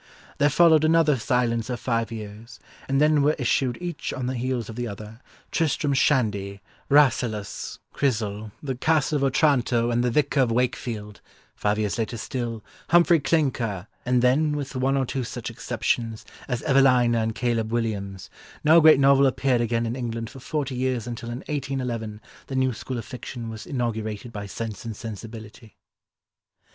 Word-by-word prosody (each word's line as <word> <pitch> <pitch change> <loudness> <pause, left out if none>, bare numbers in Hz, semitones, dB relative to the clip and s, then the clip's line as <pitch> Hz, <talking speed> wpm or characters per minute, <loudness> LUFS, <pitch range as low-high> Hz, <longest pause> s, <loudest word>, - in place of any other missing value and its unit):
there 145 - +5
followed 160 +1 +5
another 155 -2 +4
silence 115 -1 0
of 125 -1 -3
five 115 -2 -1
years, 110 +1 -9 0.3
and 135 0 +2
then 150 0 +4
were 150 +2 +3
issued 125 -1 +1
each 175 -3 -4
on 130 - -4
the 130 - -1
heels 125 -2 -2
of 115 - -8
the 120 0 -3
other, 105 +2 -9 0.3
Tristram 150 -2 +1
Shandy, 105 -8 +1 0.3
Rasselas, 120 -7 +2 0.2
Chrysal, 110 -5 -1
The 135 -2 -2
Castle 150 +3 +1
of 140 - -1
Otranto 125 -4 +2
and 120 +1 +1
The 125 - +2
Vicar 140 +2 +2
of 125 -3 +2
Wakefield—five 105 -3 -3
years 105 +1 -1
later 115 +1 -2
still—Humphrey 125 - +1
Clinker, 125 - 0 0.2
and 125 0 +2
then, 150 +4 +3
with 140 -1 -5
one 135 +2 +1
or 135 - +1
two 130 +1 -3
such 120 0 -6
exceptions 115 -1 -2 0.2
as 125 -3 -2
Evelina 130 -4 +4
and 110 0 -1
Caleb 115 -1 -1
Williams, 100 -5 -3 0.3
no 160 +2 +7
great 155 -3 +7
novel 140 0 +5
appeared 130 -1 +1
again 115 0 0
in 115 +1 -2
England 115 -3 -4
for 135 - -11
forty 140 +1 -3
years 125 -2 -1
until 120 -1 -6
in 120 +3 -5
1811 125 -7 -3 0.3
the 135 - -5
new 130 -1 +2
school 125 +3 -5
of 115 - -5
fiction 120 -2 -7
was 110 -1 -9
inaugurated 115 -3 -3
by 100 -2 -5
Sense 110 +1 -6
and 115 -2 -5
Sensibility." 110 0 -9
120 Hz, 160 wpm, -25 LUFS, 115-135 Hz, 0.3 s, no